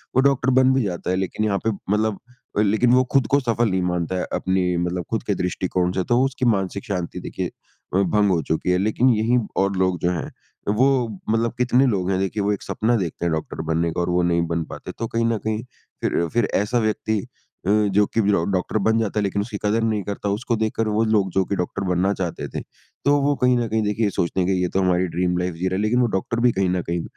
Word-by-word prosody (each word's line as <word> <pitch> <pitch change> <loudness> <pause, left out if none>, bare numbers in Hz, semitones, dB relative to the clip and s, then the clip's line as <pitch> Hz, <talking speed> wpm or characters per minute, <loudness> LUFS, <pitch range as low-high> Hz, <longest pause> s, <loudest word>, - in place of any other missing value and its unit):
वो 130 - +5
डॉक्टर 135 -1 +2
बन 130 0 +5
भी 130 -1 +2
जाता 90 -3 -3
है 90 - +2
लेकिन 95 +3 -1
यहाँ 100 -2 +1
पे - - +3 0.2
मतलब 110 -1 0 0.4
अ, - - +4
लेकिन 110 +4 +3
वो 130 0 +5
खुद 135 -5 +3
को 140 - +5
सफ़ल 120 -3 +1
नहीं 95 -1 0
मानता 90 0 -1
है - - -1
अपनी 95 -1 0
मतलब 90 +1 -1
खुद 115 - -1
के 105 -4 -1
दृष्टिकोण 90 0 -1
से, 95 0 -1
तो 120 +6 +2
उसकी 130 -1 -2
मानसिक 100 -2 0
शांति 90 -6 -3
देखिए - - -4 0.5
अ, - - +4
भंग 100 +1 +3
हो 85 -3 +2
चुकी 80 +3 -1
है। 90 - +3
लेकिन 110 +6 +2
यही 115 +3 +2 0.3
और 100 0 0
लोग 95 -2 +1
जो 90 - +1
हैं 85 -3 -4 0.4
वो 130 0 +3 0.2
मतलब 115 +1 +1
कितने 125 +2 +3
लोग 95 -7 0
हैं 95 - +1
देखिए 95 +2 -1
वो 105 +1 +2
एक 100 - -5
सपना 115 +3 0
देखते 85 -3 -3
हैं 85 - +1
डॉक्टर 80 0 -4
बनने 85 +1 +1
का 90 - -2
और 85 - -1
वो 90 0 +2
नहीं 85 -1 +2
बन 85 0 -1
पाते। - - -7
तो 115 - -2
कहीं 115 +1 0
न 115 -1 +1
कहीं 110 +1 -1 0.4
फिर 85 - 0
फिर 120 0 +2
ऐसा 110 +5 +1
व्यक्ति 110 -1 0 0.5
अ, - - +2
जो 105 -1 +3
कि 115 - 0
वि 105 -1 +2
ओ 85 - +2
डॉक्टर 95 +3 0
बन 110 +3 +2
जाता 110 -1 -1
है - - 0
लेकिन 100 0 0
उसकी 105 0 -5
कदर 105 +2 +2
नहीं 110 -3 0
करता, 100 +1 -3
उसको 115 +4 -1
देखकर 110 0 -1
वो 105 +1 +1
लोग 105 -3 +2
जो 95 +2 +2
कि 100 - -2
डॉक्टर 95 +2 -3
बनना 90 +2 +2
चाहते 90 -4 -4
थे। - - -4 0.5
तो 145 0 +5
वो 145 +1 +2
कहीं 125 0 +4
न 120 -1 0
कहीं 110 +1 +1
देखिए 105 +1 +1
सोचते 90 -1 -1
हैं 90 - +1
कि - - +3
ये 90 - +1
तो 95 - +3
हमारी 90 0 +2
ड्रीम 90 +1 0
लाइफ़ 90 -1 -2
जी 90 +3 -2
रहा 95 - -1
है, 95 - 0
लेकिन 110 +4 +2
वो 120 - +3
डॉक्टर 115 +4 -3
भी 120 +1 +4
कहीं 95 -3 0
न 90 0 0
कहीं 85 0 -3
100 Hz, 255 wpm, -22 LUFS, 90-115 Hz, 0.5 s, वो